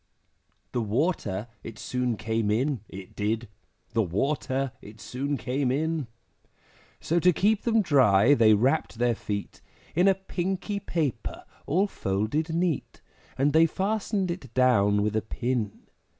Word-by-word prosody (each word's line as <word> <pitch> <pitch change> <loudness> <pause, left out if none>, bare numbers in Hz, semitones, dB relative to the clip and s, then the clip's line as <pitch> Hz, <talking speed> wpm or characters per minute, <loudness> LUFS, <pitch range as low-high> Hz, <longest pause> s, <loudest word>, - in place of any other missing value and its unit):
The 120 - -1
water 110 - -1 0.2
it 115 -1 -8
soon 125 -3 -2
came 110 -1 -1
in, 130 +5 +1
it 95 -1 -10
did, 110 +3 -1 0.4
The 115 - +2
water 130 - -1
it 105 +2 -13
soon 135 +5 -3
came 130 0 -1
in; 155 0 -1 0.9
So 170 +2 +1
to 180 +2 +5
keep 205 +5 +1
them 225 -2 +3
dry, 130 - +5
they 110 -5 +6
wrapped 115 -1 +1
their 120 0 +2
feet 105 -2 -5 0.3
In 180 +4 +3
a 195 - +5
pinky 190 +2 -3
paper 160 - -3 0.2
all 185 +7 +3
folded 110 - -1
neat, 170 -3 -2 0.3
And 140 +2 +2
they 165 +1 +6
fastened 195 0 -1
it 140 -9 -7
down 105 -6 +4
with 105 +1 -1
a 110 - +2
pin. 120 -2 -3
130 Hz, 140 wpm, -27 LUFS, 110-165 Hz, 0.9 s, they